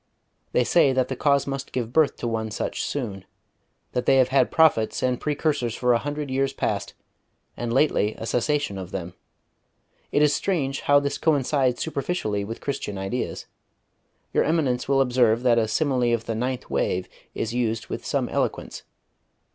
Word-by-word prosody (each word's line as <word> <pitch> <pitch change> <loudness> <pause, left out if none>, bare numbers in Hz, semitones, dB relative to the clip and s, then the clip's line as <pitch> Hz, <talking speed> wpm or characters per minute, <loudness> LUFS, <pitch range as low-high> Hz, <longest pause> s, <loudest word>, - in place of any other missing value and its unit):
They 125 - +3
say 140 0 +4
that 130 -1 +1
the 130 - -2
cause 140 +1 +2
must 135 -1 -5
give 120 -2 -3
birth 155 -2 +3
to 120 - -4
one 110 -1 -2
such 105 - -3
soon; 105 -9 -4 0.7
that 125 -1 -2
they 135 - +6
have 130 -1 +4
had 135 +1 +3
prophets 155 -9 +3
and 125 -1 0
precursors 145 -6 -1
for 125 -1 +2
a 115 - +3
hundred 145 0 -4
years 135 +1 0
past, - - -2 0.6
and 120 -1 -3
lately 120 -5 +2
a - - -6
cessation 125 -3 0
of 90 -2 -7
them. 90 -2 -5 1.0
It 145 - +3
is 150 -1 +4
strange 140 -8 -1
how 145 0 +5
this 140 0 -3
coincides 140 -4 +1
superficially 140 - -2
with 115 +3 -7
Christian 120 -7 -4
ideas. 95 +6 -3 0.9
Your - - +3
Eminence 140 -6 0
will 135 -1 +4
observe 120 -2 +3
that 120 -2 +4
a 110 - +1
simile 125 -1 +1
of 115 0 -7
the 115 - -2
'ninth 125 +3 -3
wave' 90 0 0 0.3
is 115 +1 -2
used 115 -2 -1
with - - -5
some - - -1
eloquence.... - - -2
125 Hz, 170 wpm, -24 LUFS, 115-140 Hz, 1.0 s, they